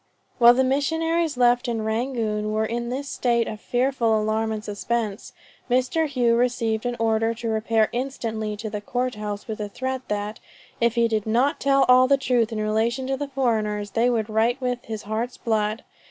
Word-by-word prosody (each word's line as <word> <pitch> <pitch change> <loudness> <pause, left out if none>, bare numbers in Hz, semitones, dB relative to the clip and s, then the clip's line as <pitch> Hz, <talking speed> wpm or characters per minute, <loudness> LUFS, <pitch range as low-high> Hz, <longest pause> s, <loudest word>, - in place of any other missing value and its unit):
While 240 0 +8
the 260 - +3
missionaries 320 +3 0
left 245 0 +3
in 230 -2 -2
Rangoon 220 -2 -1
were 215 0 0
in 235 +1 -3
this 270 +3 -4
state 235 -3 0
of 215 0 -6
fearful 245 -3 +1
alarm 220 +1 0
and 215 -1 -4
suspense, 210 0 -3 0.4
Mr. 255 +6 +1
Hough 240 -3 +2
received 240 -2 0
an 245 - -2
order 225 0 +1
to 230 0 -4
repair 220 0 +2
instantly 225 -4 -3
to 215 +1 -5
the 210 0 -4
Court 250 +4 -2
House 210 -1 -5
with 220 -1 -5
a 210 -1 -4
threat, 260 +4 -3
that 210 +1 -3 0.4
"if 235 0 +2
he 235 -1 +3
did 220 -2 -1
not 255 +8 +2
tell 275 -1 +3
all 255 +1 +6
the 275 +1 +4
truth 245 -4 +1
in 220 - -3
relation 220 +4 0
to 270 +1 -1
the 285 +2 -4
foreigners, 215 -6 -1
they 230 +4 +2
would 225 -3 0
write 225 +4 +1
with 250 -1 -3
his 220 -2 -6
heart's 225 +4 -3
blood." 215 -1 -1
235 Hz, 190 wpm, -24 LUFS, 220-255 Hz, 0.4 s, While